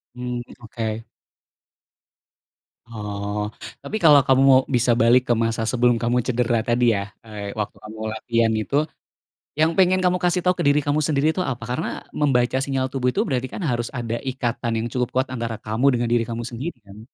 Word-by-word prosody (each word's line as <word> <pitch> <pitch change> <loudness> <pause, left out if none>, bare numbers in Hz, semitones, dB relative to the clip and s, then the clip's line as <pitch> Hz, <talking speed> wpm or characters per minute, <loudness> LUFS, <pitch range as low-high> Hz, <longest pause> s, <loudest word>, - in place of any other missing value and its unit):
Mmm, 125 -1 -4 0.2
oke. 115 -1 -4 1.8
Oh, 105 -1 -4 0.3
tapi 215 - -3
kalau 150 -3 +8
kamu 135 0 +4
mau 130 - +7
bisa 120 0 +3
balik 120 +2 +6
ke 120 - +4
masa 115 0 -1
sebelum 125 -1 +3
kamu 120 0 +1
cedera 120 -2 +1
tadi 120 +1 +2
ya, 100 0 -4
eee, 105 -2 -6
waktu 105 - -3
kamu 110 +1 -9
latihan 115 0 +1
itu, 125 - -3 0.8
yang 160 +1 +4
pengen 185 0 +4
kamu 180 0 +3
kasih 180 0 +2
tau 180 0 +3
ke - - -1
diri 145 +1 +4
kamu 145 +1 +2
sendiri 150 -1 +1
itu 185 - -1
apa? 120 -1 -8
Karena 150 +6 -1 0.3
membaca 125 -3 +2
sinyal 135 -2 -1
tubuh 125 -2 0
itu - - 0
berarti 130 -1 -1
kan - - -5
harus 120 -1 -1
ada 115 -1 -2
ikatan 120 -2 -2
yang 115 - -2
cukup 125 -2 0
kuat 130 +1 +1
antara 115 -2 -3
kamu 110 +5 0
dengan 120 0 0
diri 120 -1 +3
kamu 115 0 -4
sendiri 125 +6 -5
kan? 100 +2 -12
120 Hz, 180 wpm, -22 LUFS, 115-135 Hz, 1.8 s, kalau